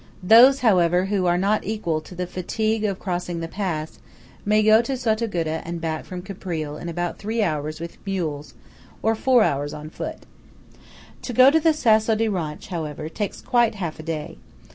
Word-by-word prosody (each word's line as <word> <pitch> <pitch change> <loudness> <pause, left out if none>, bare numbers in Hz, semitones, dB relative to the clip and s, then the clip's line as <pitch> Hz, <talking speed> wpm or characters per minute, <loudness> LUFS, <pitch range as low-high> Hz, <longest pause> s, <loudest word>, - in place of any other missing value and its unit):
Those, 245 +8 +7
however, 180 -5 +3
who 195 -2 0
are 175 0 +3
not 200 +3 +1
equal 175 -8 -2
to 180 - -12
the 180 +1 -3
fatigue 215 +5 -2
of 200 -3 -1
crossing 175 -2 -3
the 165 - -4
pass, 165 -4 -4 0.4
may 215 +1 +3
go 215 +1 +6
to 260 +3 -3
Sottoguda 215 -9 -1
and 170 0 -5
back 160 -1 -3
from 180 -1 -7
Caprile 170 -6 -5
in 170 - -5
about 175 +1 -3
three 220 +2 -1
hours 155 -3 -2
with 170 0 -9
mules, 160 -7 -4 0.5
or 225 - +3
four 245 +1 +3
hours 145 -4 -1
on 150 +1 -8
foot. - - -7 1.0
To 250 - -5
go 255 +4 +7
to 320 - +4
the 320 +1 +4
Sasso 220 -6 +3
di 225 +1 +1
Ronch, 165 -7 -4
however, 155 -3 -5
takes 205 +5 -4
quite 240 -4 +2
half 170 -6 -5
a - - -5
day. 160 0 -5
185 Hz, 185 wpm, -23 LUFS, 165-220 Hz, 1.0 s, Those